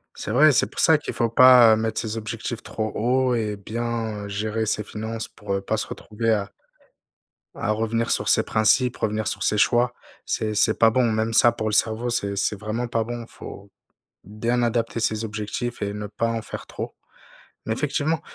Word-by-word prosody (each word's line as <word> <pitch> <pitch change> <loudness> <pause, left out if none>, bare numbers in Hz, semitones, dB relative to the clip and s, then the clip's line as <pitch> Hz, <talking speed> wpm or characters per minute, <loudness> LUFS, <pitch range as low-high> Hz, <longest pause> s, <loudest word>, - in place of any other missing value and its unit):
C'est - - -5
vrai, 150 +7 +6
c'est 130 - +3
pour - - -8
ça 160 -2 +6
qu'il 150 - -6
faut 115 -1 0
pas, 125 -1 +8
heu, - - +4
mettre 110 0 -2
ses 110 -1 -4
objectifs 115 +2 -5
trop 110 -1 -4
haut 125 +2 +1
et 110 -3 -2
bien 110 0 -4
gérer 110 +2 -2
ses 105 0 -1
finances 110 +1 -5
pour, 105 -3 -6
heu, 100 - -1
pas 110 +3 -2
se - - -3
retrouver 115 +1 -3
à 100 -2 -1 1.0
à 105 - -1
revenir 115 +1 -1
sur - - +1
ses - - +4
principes, 120 +3 +2
revenir 110 0 -1
sur - - -2
ses 105 - +1
choix, 120 +3 +3 0.3
c'est 110 -1 -1
c'est 110 +1 +3
pas 115 0 +5
bon, 120 -1 +2
même 110 +1 -1
ça 120 +1 +6
pour 110 -2 -4
le 105 - -2
cerveau 115 +3 +1
c'est 100 -4 -1
c'est 100 +2 0
vraiment 110 +3 -3
pas 115 -1 0
bon, 120 +1 -6
faut 100 -3 -11 0.5
bien 115 +4 -1
adapter 115 0 -1
ses 110 -1 0
objectifs 110 +3 -4
et 100 0 -2
ne 105 0 -5
pas 105 +3 -2
en 115 0 -2
faire 105 - -8
trop. - - -6 0.7
Mais 110 - -1
effectivement, 150 +5 -1
110 Hz, 200 wpm, -23 LUFS, 105-120 Hz, 1.0 s, pas